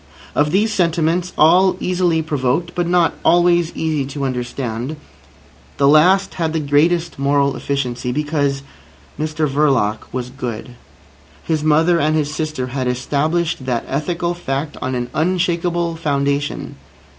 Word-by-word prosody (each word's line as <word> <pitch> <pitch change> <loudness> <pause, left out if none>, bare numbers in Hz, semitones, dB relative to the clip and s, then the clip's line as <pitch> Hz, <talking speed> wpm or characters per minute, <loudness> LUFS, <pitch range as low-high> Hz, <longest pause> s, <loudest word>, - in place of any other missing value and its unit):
Of 150 0 +2
these 210 +6 +1
sentiments, 170 0 +1
all 180 +4 +5
easily 175 -3 +1
provoked, 150 +3 -1
but 175 -1 -1
not 175 -1 +3
always 175 -1 +3
easy 155 -3 -1
to 140 0 -4
understand, 125 +1 -3 0.8
the 140 - +3
last 180 +7 +4
had 165 -2 -2
the 160 - 0
greatest 155 +3 +1
moral 140 0 +2
efficiency—because 140 +2 -2 0.6
Mr 155 0 -1
Verloc 135 -7 +1
was 125 0 -4
good. 125 -3 -6 0.7
His 155 -2 -1
mother 160 +3 +3
and 155 +1 +1
his 150 -1 -1
sister 155 -5 -3
had 130 -2 -1
established 145 +4 -1
that 120 -2 -1
ethical 170 +5 -2
fact 145 -3 -4
on 130 - -2
an 120 -1 -2
unshakable 170 0 0
foundation. 140 -2 -2
155 Hz, 130 wpm, -19 LUFS, 140-170 Hz, 0.8 s, all